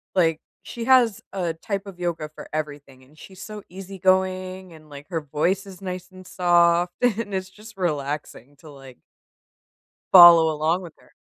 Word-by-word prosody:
like, 165 Hz, -4 st, +2 dB, 0.3 s
she 235 Hz, -1 st, -7 dB
has 250 Hz, -5 st, +4 dB
a 175 Hz, -4 st, -2 dB
type 195 Hz, +4 st, -5 dB
of 185 Hz, -3 st, -11 dB
yoga 170 Hz, -3 st, -3 dB
for -, -, -11 dB
everything, 145 Hz, -4 st, -6 dB
and 150 Hz, +4 st, -23 dB
she's 190 Hz, +2 st, -13 dB
so 210 Hz, -2 st, -9 dB
easygoing, 185 Hz, 0 st, -2 dB
and, 155 Hz, -1 st, -17 dB
like, 145 Hz, 0 st, -12 dB
her 170 Hz, -3 st, -2 dB
voice 175 Hz, +7 st, -1 dB
is 195 Hz, 0 st, -13 dB
nice 185 Hz, -1 st, -6 dB
and 185 Hz, 0 st, -14 dB
soft, 175 Hz, 0 st, +2 dB
and 225 Hz, -4 st, 0 dB
it's 190 Hz, 0 st, -3 dB
just 210 Hz, +2 st, -15 dB
relaxing 145 Hz, -5 st, -4 dB
to 155 Hz, -, -15 dB
like 135 Hz, -2 st, -14 dB, 1.2 s
follow 170 Hz, -3 st, +9 dB
along 160 Hz, +4 st, 0 dB
with 170 Hz, -3 st, -10 dB
her. -, -, -24 dB
180 Hz, 165 wpm, -23 LUFS, 155-190 Hz, 1.2 s, follow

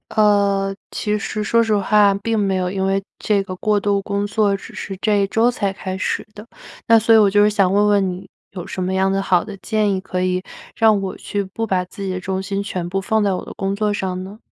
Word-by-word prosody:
呃， 200 Hz, -2 st, +2 dB
其 210 Hz, 0 st, -2 dB
实 210 Hz, +1 st, -4 dB
说 230 Hz, +2 st, +3 dB
实 220 Hz, -2 st, +1 dB
话， 205 Hz, 0 st, +4 dB
并 225 Hz, +3 st, -2 dB
没 195 Hz, -2 st, +1 dB
有， 180 Hz, -1 st, -1 dB
因 190 Hz, +1 st, -2 dB
为 195 Hz, 0 st, +1 dB, 0.2 s
这 205 Hz, -2 st, +1 dB
个 185 Hz, -1 st, -7 dB
过 210 Hz, +2 st, +1 dB
度 200 Hz, 0 st, 0 dB
工 200 Hz, 0 st, -2 dB
作 205 Hz, -1 st, +1 dB
只 -, -, -12 dB
是 195 Hz, -, -6 dB
这 210 Hz, -2 st, +2 dB
一 -, -, 0 dB
周 225 Hz, +4 st, +2 dB
才 205 Hz, -5 st, -1 dB
开 190 Hz, -1 st, -5 dB
始 -, -, -2 dB
的。 210 Hz, +1 st, -10 dB, 0.4 s
那 230 Hz, 0 st, +6 dB
所 225 Hz, +1 st, +4 dB
以 -, -, +8 dB
我 210 Hz, -2 st, +5 dB
就 205 Hz, +1 st, +4 dB
是 210 Hz, -, +5 dB
想 195 Hz, -3 st, +2 dB
问 205 Hz, +1 st, +3 dB
问 200 Hz, -2 st, +3 dB
你， 185 Hz, +2 st, -8 dB, 0.2 s
有 180 Hz, -3 st, -7 dB
什 185 Hz, -, -4 dB
么 185 Hz, -, -1 dB
样 190 Hz, 0 st, +2 dB
的 195 Hz, 0 st, 0 dB
好 185 Hz, -2 st, +2 dB
的 205 Hz, -, -8 dB
建 215 Hz, -2 st, 0 dB
议， 190 Hz, -, -2 dB
可 185 Hz, -1 st, -3 dB
以 185 Hz, 0 st, 0 dB, 0.3 s
让 220 Hz, -2 st, +4 dB
我 190 Hz, -1 st, -4 dB
去 205 Hz, -, -3 dB
不 210 Hz, +4 st, -4 dB
把 185 Hz, -4 st, 0 dB
自 195 Hz, +2 st, -9 dB
己 195 Hz, -, -3 dB
的 185 Hz, -, -3 dB
重 190 Hz, +1 st, -3 dB
心 195 Hz, +1 st, -2 dB
全 180 Hz, -4 st, -4 dB
部 195 Hz, +2 st, -1 dB
放 215 Hz, +2 st, 0 dB
在 200 Hz, -2 st, +1 dB
我 185 Hz, -, -4 dB
的 -, -, -9 dB
工 195 Hz, 0 st, -2 dB
作 210 Hz, 0 st, 0 dB
上 185 Hz, -2 st, -3 dB
呢？ 200 Hz, +3 st, -10 dB
200 Hz, 275 characters per minute, -20 LUFS, 190-210 Hz, 0.4 s, 以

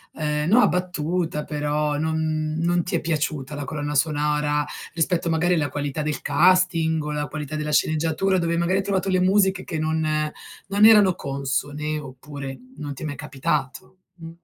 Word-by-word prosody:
ehm, 150 Hz, 0 st, -1 dB
no 225 Hz, +6 st, +6 dB
abbattuta 175 Hz, -5 st, 0 dB
però 150 Hz, 0 st, -1 dB
non 155 Hz, 0 st, -1 dB
non 175 Hz, +1 st, +1 dB
ti 180 Hz, -, -3 dB
è -, -, -4 dB
piaciuta 150 Hz, -3 st, -2 dB
la 145 Hz, -, -4 dB
colonna 150 Hz, +1 st, -4 dB
sonora, 150 Hz, 0 st, +1 dB, 0.3 s
rispetto 170 Hz, +1 st, 0 dB
magari 165 Hz, +2 st, +2 dB
alla 150 Hz, -4 st, +1 dB
qualità 145 Hz, +2 st, -3 dB
del 150 Hz, 0 st, -2 dB
casting 165 Hz, 0 st, +3 dB
o 150 Hz, -, -3 dB
la 150 Hz, 0 st, -2 dB
qualità 150 Hz, +2 st, -5 dB
della 150 Hz, 0 st, -3 dB
sceneggiatura 160 Hz, +5 st, +1 dB
dove 170 Hz, -1 st, 0 dB
magari 175 Hz, +3 st, +1 dB
hai -, -, -1 dB
trovato 195 Hz, -1 st, -1 dB
le 185 Hz, -1 st, +2 dB
musiche 190 Hz, 0 st, +3 dB
che 160 Hz, -, -4 dB
non 160 Hz, 0 st, 0 dB, 0.6 s
non 200 Hz, +2 st, +4 dB
erano 210 Hz, -4 st, +7 dB
consone 145 Hz, +2 st, -2 dB
oppure 140 Hz, -1 st, -8 dB, 0.2 s
non 145 Hz, -1 st, -6 dB
ti 135 Hz, -, -9 dB
è -, -, -3 dB
mai 145 Hz, -2 st, -4 dB
capitato? 140 Hz, +3 st, -3 dB, 0.2 s
Mh. 165 Hz, -2 st, -10 dB
155 Hz, 170 wpm, -23 LUFS, 150-175 Hz, 0.6 s, erano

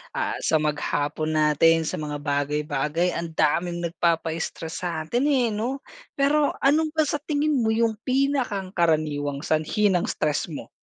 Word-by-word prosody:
ah, -, -, -1 dB
sa -, -, +2 dB
maghapon 150 Hz, +1 st, -1 dB
natin, 155 Hz, +2 st, +4 dB
sa 155 Hz, -, -3 dB
mga 150 Hz, -1 st, -4 dB
bagay-bagay, 150 Hz, +3 st, 0 dB
ang 170 Hz, -1 st, -4 dB
daming 175 Hz, +3 st, +1 dB
nagpapa-stress 165 Hz, 0 st, -2 dB
sa'tin 170 Hz, -, -1 dB
eh, 255 Hz, -5 st, +2 dB
'no? 245 Hz, +6 st, -3 dB, 0.3 s
Pero 285 Hz, +1 st, +2 dB
ano 300 Hz, +4 st, +4 dB
ba 315 Hz, -, +4 dB
sa 295 Hz, 0 st, -1 dB
tingin 295 Hz, -2 st, 0 dB
mo 220 Hz, -, +1 dB
yung 225 Hz, -1 st, +1 dB
pinakang 255 Hz, -7 st, 0 dB
karaniwang 150 Hz, -4 st, 0 dB
sanhi 160 Hz, +7 st, +1 dB
ng 180 Hz, -2 st, +1 dB
stress 150 Hz, -1 st, -1 dB
mo? 145 Hz, -, -7 dB
170 Hz, 145 wpm, -24 LUFS, 155-245 Hz, 0.3 s, natin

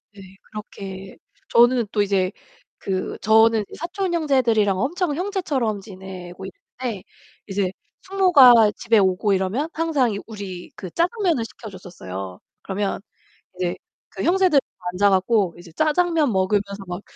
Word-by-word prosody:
예. 195 Hz, -, -12 dB, 0.3 s
그렇게 195 Hz, -2 st, -8 dB, 0.3 s
저는 240 Hz, -1 st, +4 dB
또 205 Hz, -, +1 dB
이제 195 Hz, -2 st, +1 dB, 0.5 s
그 185 Hz, -1 st, -3 dB
저는 220 Hz, 0 st, +4 dB
사촌 350 Hz, +2 st, -3 dB
형제들이랑 235 Hz, -, +2 dB
엄청 310 Hz, -, -1 dB
형제처럼 300 Hz, -, -2 dB
지내고 190 Hz, -2 st, -10 dB
있는데 205 Hz, +2 st, -7 dB, 0.4 s
이제 195 Hz, -2 st, -1 dB, 0.3 s
숙모가 275 Hz, -, +6 dB
집에 230 Hz, -, +2 dB
오고 190 Hz, +1 st, +2 dB
이러면 195 Hz, -, -1 dB
항상 295 Hz, -9 st, +1 dB
이 200 Hz, -, -4 dB
우리 195 Hz, -5 st, -8 dB
그 185 Hz, -, -8 dB
짜장면을 345 Hz, -, 0 dB
시켜줬었어요. 165 Hz, -, -9 dB, 0.2 s
그러면 195 Hz, 0 st, -3 dB, 0.5 s
이제 180 Hz, -1 st, -2 dB, 0.3 s
그 -, -, -6 dB
형제들 360 Hz, -5 st, +4 dB
다 180 Hz, -, -18 dB
앉아 200 Hz, +2 st, +3 dB
갖고 190 Hz, -1 st, +2 dB
이제 175 Hz, -2 st, -13 dB
짜장면 310 Hz, -, +2 dB
먹으면서 200 Hz, +1 st, 0 dB
막 175 Hz, +2 st, -5 dB
210 Hz, 290 characters per minute, -22 LUFS, 190-285 Hz, 0.5 s, 숙모가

